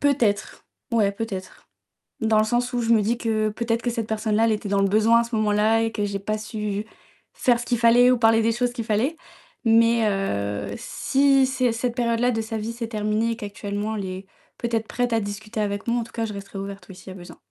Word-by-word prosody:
Peut-être, 250 -8 0 0.3
ouais 210 -4 +3
peut-être. 200 -3 -7 0.5
Dans 220 -1 +3
le - - +4
sens 245 +2 0
où 245 - 0
je 230 0 0
me 220 - +4
dis 225 +4 0
que 215 -2 0
peut-être 230 +2 -2
que 245 - -1
cette 230 -2 -3
personne-là, 220 0 +1
elle 225 - +2
était 210 -1 -4
dans 200 0 +2
le 195 - +3
besoin 220 +3 +4
à - - -1
ce 235 0 -5
moment-là 215 +1 +2
et 225 0 0
que 210 -2 -2
j'ai 200 -1 -3
pas 215 +2 -2
su 210 -1 -4 0.5
faire 240 -2 +2
ce 240 - -5
qu'il 240 - 0
fallait 240 +2 +6
ou 250 - +3
parler 225 -1 +4
des 225 +1 +2
choses 245 +1 0
qu'il 230 -2 -4
fallait. 230 +9 0 0.5
Mais, 230 0 +4
heu, 100 - -2
si 275 -1 +2
c'est 255 -2 +1
cette 230 +1 -2
période-là 235 0 +1
de 225 -2 -1
sa 220 0 -4
vie 220 +2 -4
s'est 230 0 -5
terminée 215 +1 0
et - - -2
qu'actuellement 205 +1 -4
elle 200 - -3
est 185 +1 -6 0.3
peut-être 230 -2 -2
prête 245 -1 -1
à 225 - +2
discuter 215 +2 -5
avec 205 0 -2
moi, 235 +1 +1
en - - -2
tout 230 - -13
cas 230 -1 -1
je 215 - -5
resterai 200 0 -8
ouverte, 195 -1 -7
oui, 190 - -10
s'il 190 - -12
y - - -9
a - - -10
besoin. 175 - -12
225 Hz, 240 wpm, -24 LUFS, 205-235 Hz, 0.5 s, fallait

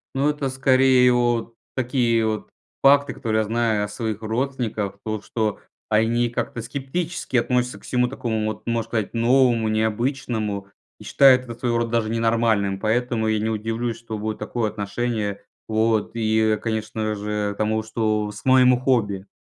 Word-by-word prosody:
Ну, 140 +2 +2
это 145 -2 -2
скорее 130 -1 +4
вот 120 -1 0 0.2
такие 120 -3 +1
вот 110 -1 -3 0.3
факты, 140 0 +5
которые 110 -1 0
я - - +1
знаю 110 -1 0
о - - -6
своих 110 0 -4
родственниках. 110 -4 -2
То, 110 -1 -3
что 110 -2 -2 0.3
они 115 +2 +2
как-то 120 0 -3
скептически 140 +5 -3
относятся 125 +1 0
ко - - -19
всему 125 -1 +1
такому 115 -4 -2
вот, 110 - -4
можно 115 -1 -1
сказать, 110 -3 -2
новому, 120 -1 +3
необычному. 110 -2 -1 0.3
И - - -12
считают 130 -2 +5
это 120 -2 -7
своего 120 0 -1
рода 115 -1 -2
даже 115 -2 +1
ненормальным, 115 -4 +1
поэтому 115 +1 0
я 110 0 +2
не 110 +1 -1
удивлюсь, 115 +2 -2
что 115 -1 -6
будет 110 +1 -4
такое 115 -3 -2
отношение. 105 -1 -3 0.2
Вот. 110 -1 +1
И, 110 -1 +2
конечно 110 -1 -2
же, 105 0 -2
тому, 110 +1 0
что 110 -1 -1
с 105 +1 -11
моему 130 -1 +5
хобби. 105 -7 0
115 Hz, 160 wpm, -23 LUFS, 110-125 Hz, 0.3 s, факты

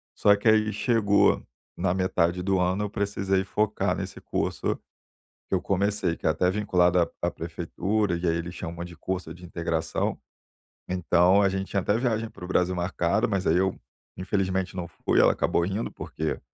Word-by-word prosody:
só 100 0 +5
que 100 +3 -3
aí 110 0 +4
chegou 105 -2 +3 0.3
na 90 - 0
metade 90 -1 +1
do 95 -1 +1
ano, 95 +3 +1
eu 105 - -2
precisei 100 -2 0
focar 105 +1 0
nesse - - -6
curso - - -1 0.7
que - - -1
eu 90 - +1
comecei, 100 -2 0
que - - -6
é - - +5
até 90 +3 +2
vinculado 90 -3 +2
à 85 - +2
à - - +1
prefeitura 90 +5 -2
e 85 0 -1
aí 80 - +2
eles 85 +1 -4
chamam 85 0 -6
de 85 0 -9
curso 90 -1 -4
de 90 +1 -12
integração. 80 -1 -2 0.7
Então, 90 +2 +4
a 100 - +4
gente 95 0 -3
tinha 100 - +1
até 105 +3 +1
viagem 115 -2 0
para 90 - -11
o - - -7
Brasil 90 0 +1
marcada 90 +3 0
mas 100 -3 -1
aí 80 - +4
eu, 95 0 +1 0.4
infelizmente 95 -1 -1
não 90 -2 -4
fui - - +1
ela - - +6
acabou 85 - +1
indo 100 +5 -2
porque 80 -1 -4
95 Hz, 185 wpm, -26 LUFS, 85-100 Hz, 0.7 s, ela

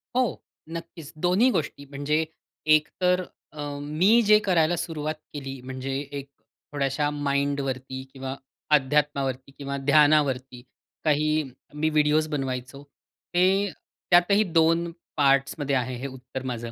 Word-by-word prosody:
हो. 255 -2 +1 0.3
नक्कीच. 165 -2 -8
दोन्ही 185 +8 +4
गोष्टी, 145 -6 -3
म्हणजे 145 +3 -1 0.5
एक 150 0 +1
तर 180 0 +3 0.3
अ, 150 - -7 0.2
मी 170 +11 +3
जे 210 0 +8
करायला 175 -3 +3
सुरुवात 155 -2 -3 0.2
केली, 135 -2 -6
म्हणजे 130 +1 -5 0.2
एक 140 -1 -6 0.5
थोड्याशा 140 +1 0
माइंडवरती 140 -2 -2
किंवा 135 0 -5 0.4
अध्यात्मावरती 135 -2 -1
किंवा 140 -1 -4
ध्यानावरती 140 -4 +3 0.4
काही 155 0 +2 0.3
मी 155 +1 0
व्हिडिओस 155 0 +3
बनवायचो, 135 -3 -4 0.5
ते 190 +3 +3 0.4
त्यातही 190 +4 +5
दोन 165 -1 +2 0.3
पार्ट्समध्ये 140 0 +2
आहे 130 0 -1
हे 130 +3 -4
उत्तर 130 0 -8
माझं. 120 -1 -5
145 Hz, 120 wpm, -26 LUFS, 135-160 Hz, 0.5 s, जे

